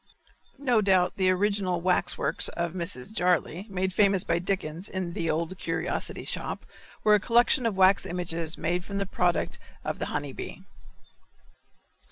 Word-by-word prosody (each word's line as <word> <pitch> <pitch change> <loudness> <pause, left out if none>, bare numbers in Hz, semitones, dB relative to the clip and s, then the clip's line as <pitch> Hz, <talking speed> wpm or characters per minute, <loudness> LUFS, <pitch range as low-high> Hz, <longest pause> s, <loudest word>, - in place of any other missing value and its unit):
No 250 -5 +2
doubt 190 -3 +3
the 185 -1 +3
original 190 -1 +1
wax 180 +1 +1
works - - +2
of 170 -1 -3
Mrs. 175 -1 -3
Jarley, 180 -1 +1
made 190 -1 -1
famous 195 -2 +3
by 170 0 +1
Dickens 180 -1 -3
in 185 -2 -3
"The 165 -1 -2
Old 170 +3 -2
Curiosity 165 +1 -2
Shop," - - -4 0.4
were 210 - +5
a 210 - +6
collection 240 +3 +3
of 205 -4 -2
wax 190 +1 +5
images 170 -2 -2
made 175 +2 -1
from 200 +1 -5
the 200 - 0
product 180 -2 0 0.3
of - - -3
the - - -2
honey - - -3
bee. - - -8
185 Hz, 160 wpm, -27 LUFS, 170-200 Hz, 0.4 s, a